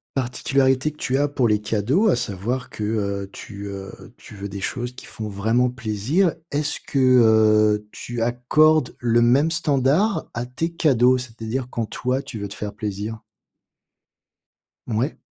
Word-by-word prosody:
Particularité 130 +2 +1
que - - -21
tu 135 -3 -1
as 145 +1 +2
pour 135 -5 +1
les 105 -1 +3
cadeaux, 115 - +1
à 190 - +4
savoir 115 +7 -3
que, 105 - -6
heu, 100 -2 -2
tu, 100 -2 -8
heu 100 -1 -7 0.2
tu - - -14
veux 100 0 -6
des 100 0 -7
choses 125 +4 -3
qui - - -11
font 110 - -6
vraiment 110 +5 +1
plaisir. 120 - 0 0.2
Est-ce 145 0 -1
que, - - -5
heu, 110 -4 +4
tu 120 -1 -6
accordes 125 +5 +3
le 120 -1 +2
même 135 +7 +4
standard 150 - +1
à 120 +1 -3
tes 145 +7 -3
cadeaux? 130 -6 +3
C'est-à-dire 120 0 -5
quand 115 -2 -2
toi 130 +4 -2
tu 135 -5 -8
veux 100 - -4
te 100 - -8
faire 105 -1 -5
plaisir. 105 +1 -4 1.7
Mouais. 120 +6 -1
120 Hz, 160 wpm, -22 LUFS, 105-135 Hz, 1.7 s, à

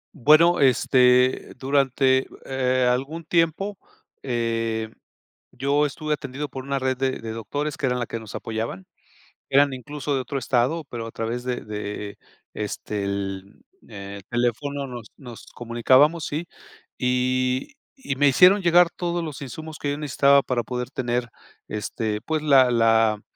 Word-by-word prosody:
Bueno, 155 +5 +5
este, 125 -1 +3
durante, 135 -1 +2 0.2
eh, 130 -1 +1
algún 135 +7 -1
tiempo, 170 +5 0 0.4
eh, 115 -3 -2 0.6
yo 140 +3 +1
estuve 150 +1 -2
atendido 140 +1 -5
por 130 0 -7
una 140 0 -1
red 130 -1 -1
de 130 0 -1
de 115 -1 -6
doctores, 145 +7 -4
que - - -8
eran 125 -1 +1
la 120 - -2
que 115 - -5
nos 110 -2 -11
apoyaban. 110 -4 -4 0.6
Eran 140 0 +4
incluso 145 +3 -4
de 130 - 0
otro 135 +2 -4
estado, 130 +5 0
pero 115 -4 -6
a 115 - -7
través 115 +2 -4
de 125 -1 -2
de 105 -1 -6 0.4
este, 105 0 -4
el, 100 - -4 0.3
eh, 100 -1 -8
el - - -16
teléfono, 135 +4 -1
nos 120 -3 -9
nos 120 -5 -11
comunicábamos, 130 +7 +2
sí. 160 +4 -4 0.5
Y 125 - 0 0.2
y 195 - -4
me 145 +2 +3
hicieron 185 +8 +6
llegar 175 0 +5
todos 175 -1 -2
los 150 -3 -7
insumos 155 +4 -8
que 145 - -2
yo 145 - -3
necesitaba 140 -1 +3
para 125 -2 -1
poder 125 0 -4
tener 120 -1 -2 0.4
este, 105 0 -3
pues 155 -1 -2
la 135 -4 +5
la 115 -2 +3
130 Hz, 150 wpm, -24 LUFS, 115-145 Hz, 0.6 s, hicieron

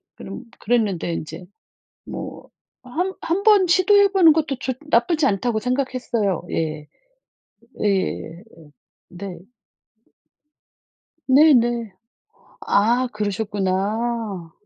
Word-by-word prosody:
그런 195 +6 -9 0.2
그랬는데 205 -7 0
인제 165 +3 -6 0.6
뭐 - - -8 0.4
어 250 - -13
한 365 +7 -2
한번 395 +2 +3
시도해 400 +3 +5
보는 355 -5 +6
것도 295 -4 -1
좋 260 - -2 0.2
나쁘지 295 +5 +2
않다고 220 +2 0
생각했어요. 250 - -1
예. 155 -2 -3 1.0
예예예예. 185 -3 -1 0.7
네. 180 -1 -8 1.9
네네. 240 -6 +4 0.8
아 240 +5 +3
그러셨구나. 205 -1 -2
230 Hz, 190 characters per minute, -22 LUFS, 195-275 Hz, 1.9 s, 보는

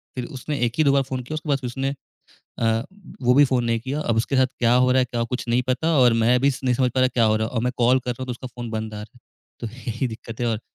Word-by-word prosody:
फिर 125 -2 -3
उसने 145 +3 -4
एक 115 - -2
ही 155 - +4
दो 140 - +4
बार 140 - +3
फोन 130 -1 -4
किया, 130 - -7
उसके 155 0 -6
बाद 140 - +3
फिर 125 - -5
उसने 135 +3 -2 0.7
अ, 115 0 +1 0.4
वो 125 0 +4
भी 145 +2 +7
फोन 130 -3 +1
नहीं 115 -1 0
किया। 135 +5 -3
अब 115 -6 0
उसके 115 +4 0
साथ 130 - +5
क्या 120 0 +3
हो 125 0 +4
रहा 130 - +3
है, - - +3
क्या, 120 -1 -3
कुछ 125 +2 -4
नहीं 120 +2 +2
पता 160 +5 +1
और 125 -2 +6
मैं 125 +2 +4
भी 140 +2 +4
स 130 - -6
नहीं 125 -1 +2
समझ 125 0 +1
पा 130 - +1
रहा, 130 - +4
क्या 120 -3 +1
हो 110 0 +3
रहा 110 - 0
है - - -12
और 115 - 0
मैं 125 - 0
कॉल 125 +2 +4
कर 125 - -4
रहा 125 - -8
हूँ, - - -4
तो 125 - -4
उसका 125 +2 -8
फोन 120 -1 -5
बंद 110 -1 -4
आ 105 - -6
रहा 110 +4 -14
है। - - -20 0.4
तो 120 - -4 0.2
यही 115 +3 -1
दिक्कत 115 0 -9
है 120 - 0
और 110 -2 -1
125 Hz, 330 wpm, -23 LUFS, 115-130 Hz, 0.7 s, भी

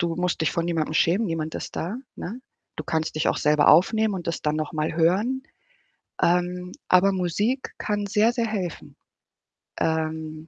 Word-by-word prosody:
Du 170 -1 0
musst 180 -1 -1
dich 160 - +2
vor 170 - -1
niemandem 160 -2 -1
schämen, 190 +8 +3
niemand 160 -2 -3
ist - - -6
da, 190 +8 -3 0.2
ne? 225 +8 -6 0.4
Du 155 - -5
kannst 155 +3 -2
dich 155 - +1
auch - - +1
selber 150 0 +3
aufnehmen 210 +6 +4
und 175 -3 -5
das 165 - -2
dann 150 0 0
noch 155 +2 -3
mal 155 0 -1
hören. 205 +11 +2 0.8
Ähm, 180 +1 +1 0.2
aber 190 +2 +5
Musik 205 +9 -1
kann 205 -1 -2
sehr, 215 +4 +3
sehr 235 -2 0
helfen, 190 -6 -5 0.8
ähm, 160 -1 -2
175 Hz, 170 wpm, -25 LUFS, 160-205 Hz, 0.8 s, aber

